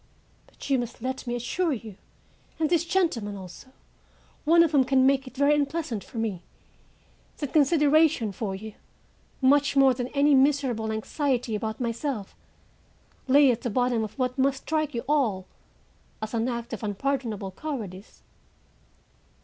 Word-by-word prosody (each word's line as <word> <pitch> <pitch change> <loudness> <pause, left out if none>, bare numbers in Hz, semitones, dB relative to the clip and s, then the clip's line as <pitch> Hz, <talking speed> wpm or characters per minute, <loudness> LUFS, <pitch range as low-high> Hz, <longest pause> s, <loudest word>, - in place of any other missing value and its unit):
But - - -11
you 270 -2 +2
must 240 -1 -6
let 260 0 -4
me 240 - -1
assure 300 +8 -1
you 220 -5 -7 0.6
and 315 0 0
these 340 -1 +2
gentlemen 255 - 0
also, 185 +6 -11 0.8
one 335 +2 +6
of 330 - +1
whom 280 -4 +4
can 260 0 +3
make 270 0 +2
it 255 - -12
very 285 +1 +4
unpleasant 285 -6 -1
for - - -12
me, 215 -6 -2 1.0
that 290 -3 -5
consideration 300 -5 +3
for 195 0 -4
you, 215 +2 -8 0.7
much 285 +2 +4
more 270 -1 +6
than 245 0 -3
any 285 +2 +3
miserable 265 -5 +2
anxiety 245 +2 -1
about 220 +1 -3
myself, 235 -2 -3 0.9
lay 275 0 +6
at 240 - -3
the 245 - -2
bottom 245 0 +1
of 215 +3 -7
what 255 0 -2
must 270 0 +1
strike 310 -3 -1
you 235 - -2
all 235 -11 +1 0.7
as 215 +1 -6
an 230 +2 0
act 235 -1 -5
of - - -5
unpardonable 220 -2 -2
cowardice. 210 - -7
255 Hz, 150 wpm, -26 LUFS, 225-285 Hz, 1.0 s, one